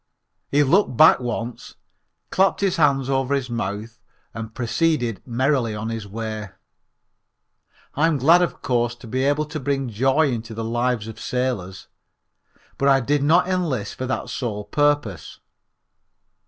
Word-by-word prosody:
He 145 +1 +3
looked 145 - +2
back 160 - +7
once, 120 -1 -5 0.6
clapped 190 +1 +2
his 195 -2 +1
hands 140 -4 +3
over 135 0 +1
his 130 -3 -3
mouth 110 +1 -4 0.3
and 110 0 -6
proceeded 120 - 0
merrily 125 -2 0
on 110 +2 -4
his 115 -3 -5
way. 110 0 -5 1.4
I 155 +3 +2
am 160 -3 +1
glad 165 +7 +5
of 175 - -2
course 120 -2 0
to 120 - -14
be 130 +4 -2
able 145 +2 +1
to 155 +1 -6
bring 135 -1 -1
joy 135 +7 +2
into 115 -1 -5
the 115 - -4
lives 120 -1 -1
of 110 - -9
sailors, 105 -8 -3 0.9
but 140 - +3
I 135 -1 +5
did 145 +3 0
not 165 +5 +4
enlist 160 - -1
for 130 - -5
that 130 - -3
sole 105 -5 -3
purpose. 145 - 0
125 Hz, 150 wpm, -22 LUFS, 115-145 Hz, 1.4 s, back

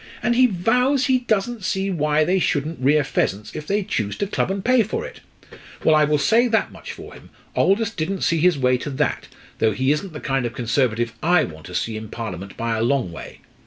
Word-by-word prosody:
And 240 - +2
he 255 +1 +6
vows 250 +8 +2
he 260 -2 +3
doesn't 230 -1 -1
see 195 +1 -1
why 150 -2 +2
they 185 +4 +2
shouldn't 155 -1 -1
rear 145 +3 +3
pheasants 105 -6 -2
if 155 0 -6
they 205 +1 0
choose 105 - -2
to - - -1
club 200 - -1
and 195 0 -3
pay 255 -1 +5
for 450 - -3
it. - - -10 0.6
Well, 160 - +5
I 155 -1 +5
will 150 0 +2
say 230 +11 +3
that 225 -1 +1
much - - -9
for - - -10
him, - - -15 0.3
Aldous 205 +2 +2
didn't 190 0 -3
see 165 - +2
his 175 -1 +3
way 125 -1 +2
to 145 - -5
that, 145 +2 -1 0.3
though 110 -1 +2
he 130 +5 +1
isn't 150 +5 -2
the 150 - -6
kind 135 -4 -1
of 115 - -8
Conservative 120 -1 0
I 170 0 +4
want 80 -1 -8
to 90 - -8
see 110 +3 -2
in 110 -1 -8
Parliament 100 -5 -6
by 115 0 -1
a - - -1
long 120 -5 +1
way. - - -10
155 Hz, 230 wpm, -22 LUFS, 125-200 Hz, 0.6 s, he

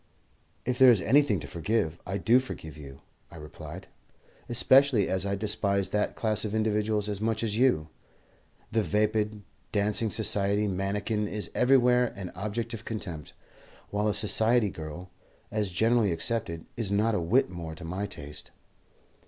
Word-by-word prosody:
"If 125 0 -2
there 130 -1 +8
is 115 -5 +5
anything 130 -2 +3
to 70 - -8
forgive, 85 +1 -2
I 95 +2 -2
do 120 +5 +4
forgive 80 - -8
you," 70 -3 -11 0.3
I - - -14
replied, 75 -2 -10 0.6
"especially 125 -2 +4
as 95 +1 -1
I 100 - -1
despise 100 -2 0
that 105 0 -1
class 110 -2 +1
of 110 0 -3
individuals 105 -1 0
as 105 -1 -3
much 110 0 -1
as 105 -2 -1
you. 115 -11 +2 0.8
The 115 - +2
vapid, 105 0 0 0.3
dancing 105 +2 +2
society 105 -1 +1
mannikin 105 +3 -2
is 105 0 -4
everywhere 125 -1 +4
an 95 -2 -7
object 105 +5 -4
of 115 - -6
contempt, 90 -9 -6 0.6
while 105 +1 0
a 105 - +1
society 110 +1 +3
girl, 85 +3 -8 0.4
as 105 -2 -1
generally 110 +3 +2
accepted, 85 -2 -2
is 110 -4 -2
not 110 +3 +2
a 105 - 0
whit 100 +6 +2
more 85 -3 -7
to 85 - -10
my 95 +5 -3
taste." 75 -2 -9
105 Hz, 155 wpm, -28 LUFS, 95-115 Hz, 0.8 s, there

